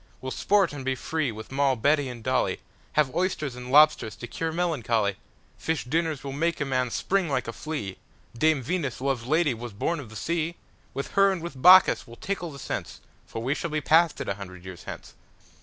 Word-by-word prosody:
We'll 130 - -5
sport 200 -1 +2
and 140 -2 -6
be 130 0 0
free 155 -1 -2
with 110 +2 -9
Moll, 135 -1 +2
Betty, 145 +3 +2
and 120 -2 -8
Dolly, 130 -7 0 0.3
Have 145 -4 +2
oysters 165 -7 -1
and 125 0 -7
lobsters 145 -7 +5
to - - -7
cure 160 +7 -3
melancholy:Fish 140 - -2
dinners 160 +2 -1
will 140 - -4
make 165 +4 0
a 140 - 0
man 130 -2 0
spring 190 +7 0
like 130 -4 -1
a 115 - -4
flea, 115 -10 -5 0.4
Dame 155 +2 +2
Venus, 145 -3 -2
love's 130 -3 -1
lady, 155 -1 +3
Was 120 -1 -7
born 165 +11 -1
of 130 -6 -9
the 110 - -12
sea:With 165 -1 -4
her 195 0 +5
and 190 - -2
with 160 -6 -7
Bacchus 185 -4 +7
we'll 115 - -11
tickle 175 +2 -4
the 140 - -10
sense, 135 - -5 0.3
For 115 - -5
we 130 +4 +1
shall 170 +2 -3
be 155 0 -1
past 160 +2 +3
it - - -4
a 100 - 0
hundred 95 -2 -10
years 90 -2 -9
hence. - - -8
140 Hz, 205 wpm, -26 LUFS, 120-160 Hz, 0.4 s, Bacchus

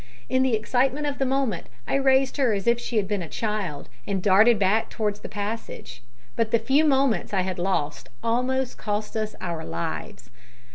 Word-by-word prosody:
In 260 - +2
the 260 -3 +3
excitement 260 +6 +1
of 285 -1 -3
the 270 - +1
moment 260 -9 0 0.2
I - - -2
raised 270 0 +3
her 255 -6 +3
as 195 -2 -2
if 235 0 +3
she 240 -1 -3
had 200 -2 +1
been 205 -1 -1
a 165 - -6
child, 210 -10 -3 0.2
and 195 -1 0
darted 210 +5 +5
back 205 +3 +2
towards 210 -2 -2
the - - -8
passage, 205 - -5 0.3
but 225 -1 +1
the 230 - +4
few 280 +7 +3
moments 265 - +2
I 190 - +3
had 185 -1 -3
lost 150 -7 -1
almost 250 +2 0
cost 210 0 -3
us 215 -1 -2
our 170 -3 -4
lives. 85 +7 -5
220 Hz, 190 wpm, -25 LUFS, 195-260 Hz, 0.3 s, darted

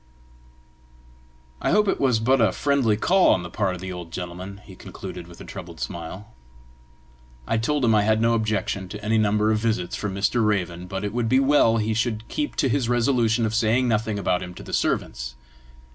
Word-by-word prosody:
"I - - 0
hope 210 +3 +3
it - - +1
was 125 -5 +3
but 130 +3 +3
a 110 - +4
friendly 135 -7 +1
call 185 - +4
on 90 - -4
the 85 - -8
part 95 -3 -1
of 90 - -10
the 95 0 -5
old 90 -2 -8
gentleman!" 90 +3 -6
he 95 - -12
concluded, 90 -1 -9
with 85 -1 -14
a - - -9
troubled 85 -4 -9
smile. 90 +1 -6 1.1
I 115 - 0
told 140 +3 0
him 115 - +4
I 105 - +4
had 110 +1 +2
no 115 +1 +3
objection 105 -4 -1
to 105 +1 -8
any 110 +1 +2
number 105 0 +2
of 110 - +1
visits 110 -6 -1
from 100 -2 -4
Mr. 105 +4 +1
Raven, 90 -4 -1
but 95 +1 -4
it 105 0 -3
would 120 -1 0
be 130 - +4
well 135 -5 +4
he 110 0 0
should 110 0 -1
keep 300 -1 -3
to - - +2
his 125 -2 0
resolution 120 -2 +2
of 110 - -2
saying 115 +3 +2
nothing 110 -2 0
about 90 -2 0
him 90 0 -7
to - - -10
the - - -9
servants. 65 0 -1
110 Hz, 205 wpm, -24 LUFS, 95-115 Hz, 1.1 s, a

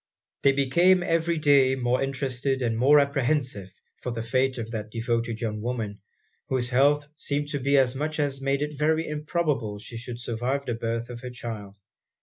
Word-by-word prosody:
They 140 - +5
became 170 +7 +4
every 165 0 +1
day 140 -3 +4
more 125 -1 0
interested 135 -1 -1
and 115 -2 0
more 140 +6 +6
apprehensive 135 -7 0 0.3
for 125 - -3
the 115 -1 -4
fate 130 +3 +1
of 115 -1 -5
that 110 -2 -4
devoted 115 0 -2
young 105 -2 -2
woman, 110 -4 -3 0.5
whose 125 -2 0
health 145 +3 +3
seemed 145 -1 -2
to 145 -2 -2
be 140 +2 +2
such 150 +5 -3
as 140 -2 0
made 140 +1 +1
it 150 0 -4
very 160 +3 +1
improbable 150 -7 -1
she 110 +3 -8
should 120 0 -6
survive 125 +4 -2
the 120 - -1
birth 115 +1 -3
of 120 - -7
her 125 +1 -7
child. 110 -5 -7
130 Hz, 175 wpm, -26 LUFS, 115-145 Hz, 0.5 s, more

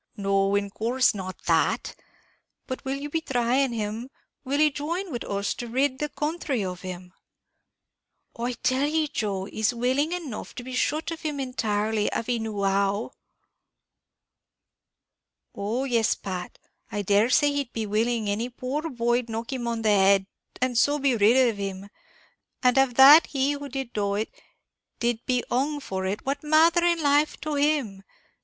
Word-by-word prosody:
"No, 195 0 +1
in 200 0 -1
course 245 +5 +2
not 185 -2 -7
that; - - +1 0.7
but 260 - -6
will 270 +1 -2
you 280 +1 -5
be 320 +2 -1
thrying 255 -1 +1
him, 225 +2 -4 0.3
will 280 +1 -1
he 305 0 +4
join 335 +6 -4
wid 240 - -4
us 200 0 -2
to 240 - -6
rid 260 +3 0
the 300 - -2
counthry 295 - -2
of 180 -1 -5
him?" 180 -1 -8 1.2
"I 240 +2 -2
tell 260 +4 0
ye, 315 0 +1
Joe, 200 -8 -2
he's 220 +3 -1
willing 260 +6 +1
enough 330 -11 -5
to 245 - -6
be 255 +1 -8
shut 305 +5 0
of 330 - -6
him 300 -3 -3
entirely, 220 -5 -1
av - - -2
he 240 0 -1
knew 215 -2 -3
how." 195 +2 +1 2.4
"Oh 220 +6 -2
yes, 235 -5 +2
Pat, 180 -2 -6 0.3
I 205 - -2
dare 205 +4 +3
say 290 +3 +4
he'd 280 -4 -2
be 225 -1 -3
willing 220 +1 0
any 215 +4 -1
poor 265 +6 -4
boy'd 240 -2 0
knock 225 +3 -4
him 245 -2 -3
on 230 -1 -2
the 215 - +3
head, 195 -1 +4 0.3
and 250 -2 +1
so 290 +3 +3
be 275 -3 +2
rid 235 +4 +5
of 225 -3 -1
him; 195 0 -5 0.7
and 250 -1 +4
av 265 -3 +2
that 285 +5 +9
he 275 0 0
who 285 0 -5
did 265 -2 -5
do 200 -1 -1
it, 215 +2 -2 0.7
did 235 -1 -1
be 250 -1 +1
hung 285 +4 0
for 190 -8 -4
it, 200 +2 -4
what 280 +1 -2
matther 325 +3 +4
in 340 -2 +2
life 290 +1 +2
to 305 0 -3
him? 285 -9 0
245 Hz, 170 wpm, -26 LUFS, 210-280 Hz, 2.4 s, that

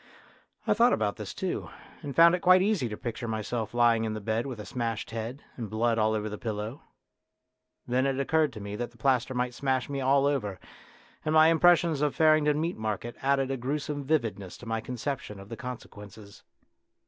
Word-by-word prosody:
I - - +3
thought 235 +3 +4
about 105 -2 0
this 105 -3 -6
too, 190 -2 -3 0.3
and 145 -4 -6
found 170 +1 +7
it 180 - +1
quite 185 +1 +6
easy 195 - +1
to 105 - -6
picture 120 -1 -5
myself 110 0 -3
lying 120 -2 +3
in 110 -1 -2
the - - -4
bed 110 +4 -1
with 125 -5 -6
a 105 - -7
smashed 115 -4 -3
head, 115 +5 -5
and 115 -4 -6
blood 115 +2 +1
all 110 0 +2
over 105 0 -2
the 105 0 -6
pillow. 110 +3 -4 1.1
Then 130 +2 +2
it 135 0 -1
occurred 155 +2 +2
to 110 - -8
me 100 0 -6
that 120 +1 -3
the 120 - -22
plaster 130 +1 +1
might 125 0 -1
smash 130 -1 -1
me 140 -1 -3
all 135 +1 +3
over, 105 -10 -1 0.6
and 155 +1 0
my 155 +1 +7
impressions 165 -2 +4
of 150 -2 +1
Farringdon 155 -2 +4
Meat 165 +3 -2
Market 110 +2 -3
added 135 0 +1
a 135 - -1
gruesome 145 +3 -3
vividness 115 - -1
to - - -12
my 115 0 -2
conception 125 -3 -5
of 100 +1 -12
the 115 - -6
conse 125 -1 -6
quences. 105 0 -13
125 Hz, 205 wpm, -28 LUFS, 110-145 Hz, 1.1 s, found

